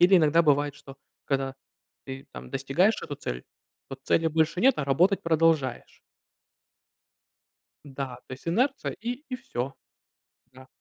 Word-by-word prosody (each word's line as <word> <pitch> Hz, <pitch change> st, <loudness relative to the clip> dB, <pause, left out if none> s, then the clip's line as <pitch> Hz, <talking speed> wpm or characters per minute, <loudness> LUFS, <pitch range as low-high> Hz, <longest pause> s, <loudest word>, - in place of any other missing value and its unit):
Или 185 Hz, +2 st, +7 dB
иногда 165 Hz, 0 st, +5 dB
бывает, 145 Hz, -2 st, +2 dB
что 135 Hz, -1 st, -13 dB, 0.3 s
когда 135 Hz, -1 st, -1 dB, 0.5 s
ты 135 Hz, 0 st, -7 dB
там -, -, -9 dB
достигаешь 140 Hz, +10 st, +2 dB
эту 145 Hz, -, -5 dB
цель, 65 Hz, -, -5 dB, 0.4 s
то 135 Hz, -, -6 dB
цели 165 Hz, +3 st, +2 dB
больше 160 Hz, +3 st, +1 dB
нет, 265 Hz, +1 st, +6 dB
а 145 Hz, -, 0 dB
работать 175 Hz, +9 st, +3 dB
продолжаешь. 160 Hz, -6 st, +1 dB, 1.8 s
Да, 135 Hz, -2 st, -5 dB
то -, -, -10 dB
есть, 130 Hz, -, -10 dB
инерция 255 Hz, +11 st, +1 dB
и 245 Hz, +6 st, -5 dB
и 255 Hz, -, -3 dB
всё. 135 Hz, -, -4 dB, 0.8 s
Да. 130 Hz, 0 st, -15 dB
150 Hz, 140 wpm, -27 LUFS, 135-180 Hz, 1.8 s, Или